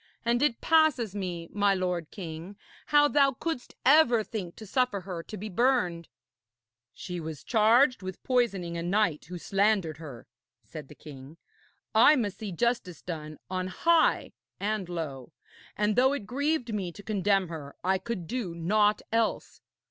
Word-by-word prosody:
And 240 +1 +2
it 285 -6 +1
passes 310 - +3
me, 180 -4 -4
my 205 -1 +2
lord 180 -3 -2
king, 170 +1 -8 0.3
how 290 0 +5
thou 280 -2 +3
couldst 320 -2 -5
ever 255 -5 +5
think 195 -6 -6
to 220 - -10
suffer 230 -2 0
her 180 -2 -6
to 210 - -9
be 210 - -6
burned.' 185 -6 +1 0.9
'She 180 -2 -6
was 160 -3 -7
charged 240 +3 +4
with 185 0 -7
poisoning 200 -9 0
a 170 - -3
knight 175 -3 0
who 180 - -7
slandered 195 -4 +1
her,' 140 -8 -10 0.4
said 140 +6 -9
the 150 - -13
king. 140 +1 -12 0.6
'I 230 +7 +7
must 205 -7 -2
see 210 -3 -5
justice 195 -4 -1
done 155 -3 -6
on 185 0 -3
high 335 - +2 0.3
and 205 -3 -2
low, 150 -7 -5 0.4
and 210 0 +1
though 260 +2 +4
it 280 -8 -4
grieved 270 0 -1
me 190 -4 -2
to 205 - -12
condemn 195 -3 +1
her, 150 -4 -8
I 190 +1 +2
could 200 -3 -5
do 215 -5 -4
naught 210 +5 +2
else. 225 0 -1
200 Hz, 160 wpm, -28 LUFS, 170-235 Hz, 0.9 s, I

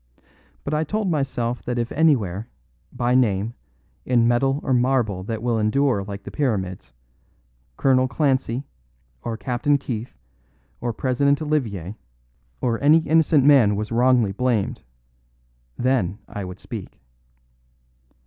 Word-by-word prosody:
But 145 - -3
I 155 +1 +1
told 210 +3 -1
myself 125 -5 -1
that 125 0 -3
if 120 0 -2
anywhere, 115 - +1 0.4
by 120 0 0
name, 110 -3 +2 0.5
in 120 -2 +3
metal 135 +4 +2
or 130 - 0
marble 120 -6 +1
that 110 +1 -4
will 120 -2 +1
endure 110 0 +1
like 100 0 -7
the - - -8
pyramids, 95 - -2 0.9
Colonel 130 -1 +3
Clancy, 130 -1 0 0.6
or 115 -1 -4
Captain 130 +4 +1
Keith, 120 -4 -6 0.6
or 120 0 -2
President 135 +4 +1
Olivier, 110 - -2 0.7
or 115 -2 0
any 150 +3 +6
innocent 160 -2 +3
man 130 -8 +6
was 105 +2 -4
wrongly 120 -3 +3
blamed, 110 - -1 1.0
then 120 -7 0
I 100 -2 -6
would 90 +1 -8
speak. - - -8
125 Hz, 125 wpm, -23 LUFS, 110-135 Hz, 1.0 s, any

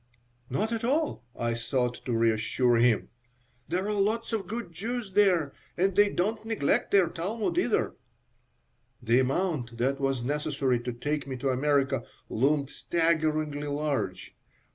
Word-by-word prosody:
"Not 210 - -1
at 230 -1 -2
all," 290 - 0
I 115 0 0
sought 120 +1 -1
to 120 -3 0
reassure 115 +2 +2
him. 115 -2 +3 0.6
"There 185 +2 -1
are 210 - -1
lots 220 +3 0
of 215 -3 -1
good 230 -4 -5
Jews 220 +5 -4
there, 180 -8 +3 0.2
and 190 +1 +2
they 205 0 +5
don't 210 +4 -1
neglect 220 -10 +1
their 195 -3 +5
Talmud, 200 +7 -2
either." - - +1 1.1
The 120 +2 +4
amount 130 -3 -1
that 135 +3 0
was 135 -3 0
necessary 140 -2 0
to 125 +1 -4
take 140 +4 -3
me 130 -1 -4
to 135 +2 -1
America 140 +1 +1 0.3
loomed 140 +3 +1
staggeringly 155 -3 0
large. 140 -11 -2
150 Hz, 140 wpm, -28 LUFS, 125-195 Hz, 1.1 s, they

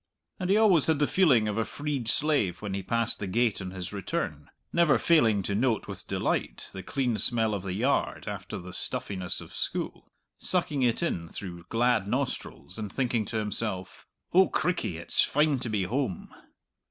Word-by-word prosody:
And 185 -1 -2
he 200 - +5
always 195 -9 +5
had 160 -2 +3
the 145 - +3
feeling 140 - +4
of 105 +1 -1
a - - +2
freed 145 -2 -3
slave 115 - +2
when 100 -2 -3
he 100 - -2
passed 115 +4 0
the 100 - -3
gate 115 +2 +1
on 95 - -4
his 90 +1 -6
return, 75 -6 -3 0.2
never 170 -4 +5
failing 115 - +4
to 100 - -2
note 115 +2 +1
with - - -7
delight - - -1
the 95 - -6
clean 125 0 -1
smell 110 0 +2
of 100 - -2
the 95 -1 -4
yard 130 +7 0
after - - -5
the 90 0 -9
stuffiness 95 -2 -2
of - - -11
school, - - -3 0.3
sucking 160 -6 0
it 120 +5 +2
in 85 - -1
through 85 -2 -7
glad 115 -3 +2
nostrils, 120 -5 -3
and 105 -3 -4
thinking 120 -4 0
to 110 - -3
himself, 105 -3 -3 0.3
"O 190 +2 +7
crickey, 110 - -1
it's 85 - +1
fine 150 -2 +2
to 120 -1 -3
be 105 -3 0
home!" 120 -1 -2
115 Hz, 185 wpm, -28 LUFS, 95-140 Hz, 0.3 s, O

